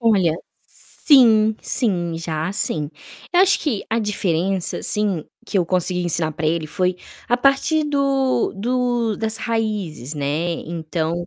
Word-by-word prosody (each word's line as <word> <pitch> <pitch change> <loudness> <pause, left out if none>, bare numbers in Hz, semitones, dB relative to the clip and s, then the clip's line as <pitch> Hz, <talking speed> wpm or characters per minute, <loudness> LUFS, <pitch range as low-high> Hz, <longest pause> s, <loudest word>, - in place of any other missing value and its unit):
Olha, 195 -8 +3 0.3
sim, 220 -6 +3
sim, 175 -9 -1
já, 160 0 -3
sim. 155 -6 -1 0.4
Eu 355 - +5
acho 390 +1 +4
que 240 -10 -2
a 225 - +1
diferença, 190 -3 -1
assim, 205 -7 0 0.2
que 200 - 0
eu 175 - +1
consegui 180 0 0
ensinar 165 -2 -1
pra 155 +1 -3
ele 160 0 0
foi 180 +4 -1 0.3
a 245 - +3
partir 275 +4 +2
do 275 -3 +1
do 240 0 0
das 220 0 +1
raízes, 205 - -3
né. 150 +4 -1
Então, 165 +1 -3
195 Hz, 140 wpm, -21 LUFS, 165-235 Hz, 0.4 s, Eu